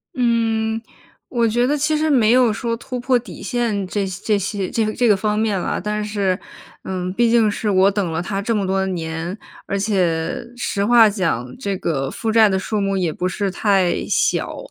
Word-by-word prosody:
嗯， 225 Hz, -2 st, +1 dB, 0.5 s
我 235 Hz, -2 st, +1 dB
觉 240 Hz, +3 st, +1 dB
得 295 Hz, +2 st, +1 dB
其 310 Hz, +2 st, +1 dB
实 310 Hz, +1 st, +1 dB
没 235 Hz, -7 st, +4 dB
有 250 Hz, -2 st, +5 dB
说 230 Hz, +2 st, -2 dB
突 250 Hz, +2 st, -6 dB
破 255 Hz, +1 st, +2 dB
底 225 Hz, -6 st, -11 dB
线 220 Hz, -3 st, -1 dB
这 200 Hz, +2 st, -1 dB
这 195 Hz, +3 st, -1 dB
些 195 Hz, -1 st, -3 dB
这 225 Hz, -, 0 dB
个 215 Hz, -, -2 dB
这 245 Hz, -, +1 dB
个 210 Hz, -, +5 dB
方 210 Hz, +2 st, -1 dB
面 215 Hz, -3 st, +1 dB
啦， -, -, -2 dB
但 210 Hz, +2 st, -2 dB
是， 200 Hz, -3 st, 0 dB, 0.5 s
嗯， 185 Hz, -1 st, -3 dB
毕 235 Hz, +3 st, +2 dB
竟 225 Hz, -2 st, +4 dB
是 210 Hz, +1 st, -2 dB
我 190 Hz, 0 st, +4 dB
等 195 Hz, -4 st, -1 dB
了 160 Hz, -, -2 dB
他 195 Hz, +2 st, -3 dB
这 230 Hz, +3 st, -1 dB
么 200 Hz, -2 st, 0 dB
多 190 Hz, 0 st, 0 dB
年， 165 Hz, +1 st, -4 dB, 0.3 s
而 200 Hz, -, -1 dB
且 195 Hz, +2 st, 0 dB
实 200 Hz, -4 st, -1 dB
话 230 Hz, +1 st, +6 dB
讲 160 Hz, -, -2 dB
这 200 Hz, -1 st, -2 dB
个 135 Hz, -7 st, -2 dB
负 225 Hz, +8 st, -3 dB
债 220 Hz, -1 st, +6 dB
的 190 Hz, -, +1 dB
数 205 Hz, +2 st, -2 dB
目 195 Hz, 0 st, 0 dB
也 175 Hz, -4 st, 0 dB
不 180 Hz, -, -2 dB
是 195 Hz, +1 st, -2 dB
太 190 Hz, -2 st, +1 dB
小。 -, -, 0 dB
205 Hz, 220 characters per minute, -20 LUFS, 190-230 Hz, 0.5 s, 话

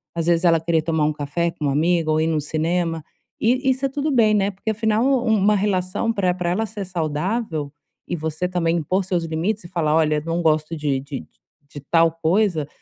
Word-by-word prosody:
As 165 Hz, -, -1 dB
vezes, 170 Hz, +1 st, +2 dB
ela 165 Hz, -1 st, +5 dB
querer 165 Hz, -1 st, +1 dB
tomar 160 Hz, -1 st, 0 dB
um 155 Hz, -, +1 dB
café 150 Hz, +3 st, -2 dB
com 150 Hz, -, -5 dB
uma 140 Hz, -, +1 dB
amiga 165 Hz, +1 st, +1 dB
ou 155 Hz, -, +2 dB
ir 160 Hz, -, +1 dB
no 160 Hz, -2 st, 0 dB
cinema. 165 Hz, +2 st, -1 dB, 0.4 s
E 230 Hz, +3 st, +3 dB
e -, -, +6 dB
isso 260 Hz, +1 st, -1 dB
é 275 Hz, -, 0 dB
tudo 290 Hz, +3 st, -2 dB
bem, 225 Hz, -5 st, +4 dB
né. 200 Hz, -1 st, +2 dB
Porque 195 Hz, +3 st, -5 dB
afinal 220 Hz, +1 st, +1 dB
um 245 Hz, -5 st, +2 dB
uma 210 Hz, +2 st, +3 dB
relação 200 Hz, +2 st, 0 dB
pra 185 Hz, -4 st, +1 dB
pra 180 Hz, -1 st, -2 dB
ela 220 Hz, +5 st, 0 dB
ser 205 Hz, -1 st, -6 dB
saudável 165 Hz, -1 st, -2 dB, 0.4 s
e 175 Hz, -, -2 dB
você 160 Hz, +2 st, -3 dB
também 175 Hz, -2 st, 0 dB
impor 185 Hz, +5 st, 0 dB
seus 180 Hz, -3 st, -1 dB
limites 170 Hz, +7 st, -2 dB
e 170 Hz, -, -9 dB
falar: 160 Hz, -4 st, 0 dB
"Olha 155 Hz, -2 st, +2 dB
não 165 Hz, +1 st, -1 dB
gosto 155 Hz, 0 st, +1 dB
de 145 Hz, -3 st, 0 dB
de 140 Hz, -, -7 dB, 0.4 s
de 145 Hz, -, -9 dB
tal 165 Hz, -1 st, +5 dB
coisa". 165 Hz, -1 st, +1 dB
170 Hz, 220 wpm, -22 LUFS, 155-200 Hz, 0.4 s, e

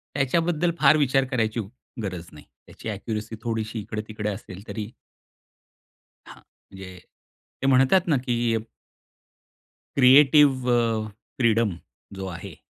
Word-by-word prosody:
त्याच्याबद्दल 165 Hz, +5 st, +1 dB
फार 150 Hz, +1 st, +6 dB
विचार 135 Hz, -2 st, +2 dB
करायची 110 Hz, -2 st, 0 dB, 0.4 s
गरज 90 Hz, -3 st, -5 dB
नाही. 75 Hz, -, -14 dB, 0.2 s
त्याची 115 Hz, -, -8 dB
ॲक्यूरसी 110 Hz, +2 st, -5 dB
थोडीशी 110 Hz, -1 st, -3 dB
इकडे-तिकडे 105 Hz, 0 st, -5 dB
असेल 100 Hz, -1 st, -8 dB
तरी 110 Hz, -1 st, -5 dB, 1.4 s
हां. -, -, -13 dB, 0.3 s
म्हणजे 95 Hz, -2 st, -10 dB, 0.6 s
ते 135 Hz, -, 0 dB
म्हणतात 135 Hz, +8 st, +4 dB
ना, 150 Hz, -5 st, +3 dB
की 120 Hz, -2 st, 0 dB, 1.4 s
क्रिएटिव 135 Hz, -1 st, +6 dB
अ, 115 Hz, -2 st, +1 dB, 0.3 s
फ्रीडम 115 Hz, -6 st, +2 dB, 0.4 s
जो 95 Hz, 0 st, -6 dB
आहे. 85 Hz, -2 st, -8 dB
115 Hz, 110 wpm, -24 LUFS, 105-135 Hz, 1.4 s, फार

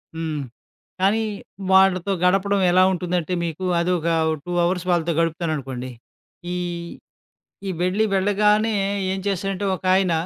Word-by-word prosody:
హ్మ్. 160 Hz, -2 st, -3 dB, 0.6 s
కానీ, 210 Hz, +4 st, +3 dB, 0.5 s
వాళ్ళతో 190 Hz, 0 st, +4 dB
గడపడం 195 Hz, +2 st, +2 dB
ఎలా 185 Hz, +1 st, +5 dB
ఉంటుందంటే, 180 Hz, -1 st, -2 dB
మీకు 170 Hz, +3 st, -4 dB
అదొక 170 Hz, -1 st, 0 dB, 0.4 s
2 180 Hz, -, -4 dB
అవర్స్ 180 Hz, +1 st, 0 dB
వాళ్ళతో 170 Hz, -1 st, +1 dB
గడుపుతాననుకోండి, 155 Hz, -7 st, -2 dB, 0.6 s
ఈ -, -, -2 dB, 1.3 s
వెళ్ళి 185 Hz, +4 st, +1 dB
వెళ్ళగానే 210 Hz, +3 st, +2 dB, 0.4 s
ఏం 190 Hz, -, -2 dB
చేశారంటే, 195 Hz, 0 st, -1 dB
ఒకాయన 185 Hz, -1 st, +2 dB
185 Hz, 105 wpm, -22 LUFS, 170-195 Hz, 1.3 s, ఎలా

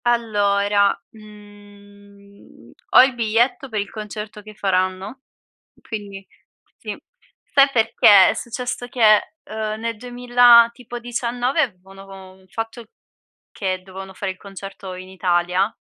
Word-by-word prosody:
Allora, 205 Hz, -3 st, +1 dB
mhmm, 205 Hz, -1 st, -17 dB, 0.2 s
ho -, -, +8 dB
il 265 Hz, 0 st, +1 dB
biglietto 240 Hz, +3 st, 0 dB
per 215 Hz, -3 st, -2 dB
il 200 Hz, 0 st, -4 dB
concerto 210 Hz, 0 st, -8 dB
che 215 Hz, 0 st, -13 dB
faranno, 190 Hz, +4 st, -2 dB, 0.6 s
quindi 200 Hz, -3 st, -8 dB, 0.5 s
sì. -, -, -6 dB, 0.5 s
Sai 275 Hz, 0 st, +4 dB
perché? 220 Hz, -4 st, +6 dB
È -, -, +1 dB
successo 245 Hz, +1 st, -5 dB
che, 215 Hz, -4 st, +5 dB, 0.2 s
ehm, 215 Hz, 0 st, -5 dB
nel 230 Hz, -1 st, -4 dB
2000 245 Hz, 0 st, +5 dB
tipo 240 Hz, 0 st, -9 dB
19 245 Hz, +4 st, -1 dB
avevano 195 Hz, -6 st, -6 dB
von 190 Hz, -1 st, -14 dB
fatto 225 Hz, +4 st, -6 dB, 0.7 s
che 185 Hz, -2 st, -3 dB
dovevano 190 Hz, 0 st, -10 dB
fare 190 Hz, 0 st, -4 dB
il 185 Hz, -, -12 dB
concerto 195 Hz, -1 st, -9 dB
in 185 Hz, 0 st, -9 dB
Italia 180 Hz, +2 st, 0 dB
210 Hz, 120 wpm, -21 LUFS, 195-235 Hz, 0.7 s, ho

